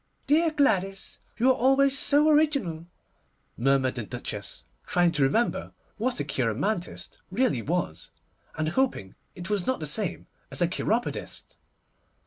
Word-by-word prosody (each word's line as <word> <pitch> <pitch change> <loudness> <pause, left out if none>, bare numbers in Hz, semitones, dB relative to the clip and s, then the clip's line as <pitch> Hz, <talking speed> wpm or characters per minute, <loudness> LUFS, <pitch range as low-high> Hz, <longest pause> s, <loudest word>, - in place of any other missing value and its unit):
'Dear 320 +3 +3
Gladys! 195 -11 0 0.2
you 250 +3 +4
are - - +2
always 270 +2 +4
so 290 +2 +5
original,' 280 - +2 0.7
murmured 130 +1 +2
the 120 - -4
Duchess, 105 - -6 0.2
trying 175 -1 +3
to 150 -3 -1
remember 145 - +1 0.2
what 245 0 -1
a - - 0
cheiromantist 140 - -2
really 205 - +1
was, 165 - -3 0.5
and 155 0 0
hoping 170 - -1 0.2
it 180 +2 -7
was 200 -4 0
not 260 - 0
the 155 - -4
same 170 +6 -1 0.2
as - - -2
a 175 - +4
cheiropodist. 220 +7 -3
195 Hz, 135 wpm, -27 LUFS, -, 0.7 s, so